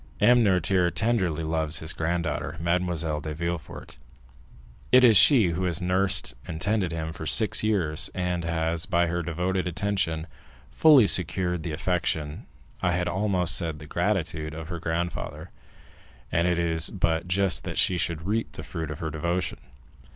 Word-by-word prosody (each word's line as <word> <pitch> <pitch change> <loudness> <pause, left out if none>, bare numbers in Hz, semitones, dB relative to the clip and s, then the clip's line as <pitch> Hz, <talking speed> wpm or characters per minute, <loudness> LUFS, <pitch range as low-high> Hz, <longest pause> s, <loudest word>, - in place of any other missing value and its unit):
M. 120 0 +5
Noirtier 90 -2 +2
tenderly 95 -7 0
loves 80 -1 -1
his 80 - -2
granddaughter, 80 -2 -2
Mademoiselle 85 -3 -1
de 75 0 -5
Villefort; 85 0 -6 0.9
it 130 0 +7
is 115 -3 +7
she 110 - +6
who 90 +2 -2
has 90 0 0
nursed 95 -6 0
and 80 - -5
tended 100 -1 0
him 80 -1 -4
for 80 - -6
six 110 +5 +4
years, 90 -8 0
and 90 -2 -2
has, 80 0 -1
by 85 -3 +2
her 85 +1 -2
devoted 90 +3 -2
attention, 90 -3 -1 0.5
fully 150 -8 +6
secured 90 0 +1
the 80 0 -5
affection, 80 -2 -2 0.3
I 90 - +1
had 90 0 -1
almost 90 -1 +1
said 80 -4 0
the 75 - -11
gratitude, 80 -3 -2
of 80 0 -8
her 85 -1 -5
grandfather, 85 +1 -4 0.8
and 85 +2 +1
it 90 -1 +1
is 80 -1 +1
but 85 -3 -1
just 95 +1 +2
that - - -5
she 90 -2 +2
should 80 -1 -2
reap 110 +3 -2
the - - -8
fruit 80 -2 -5
of 75 - -5
her 80 -1 -3
devotion." 85 +4 -2
85 Hz, 160 wpm, -26 LUFS, 80-95 Hz, 0.9 s, it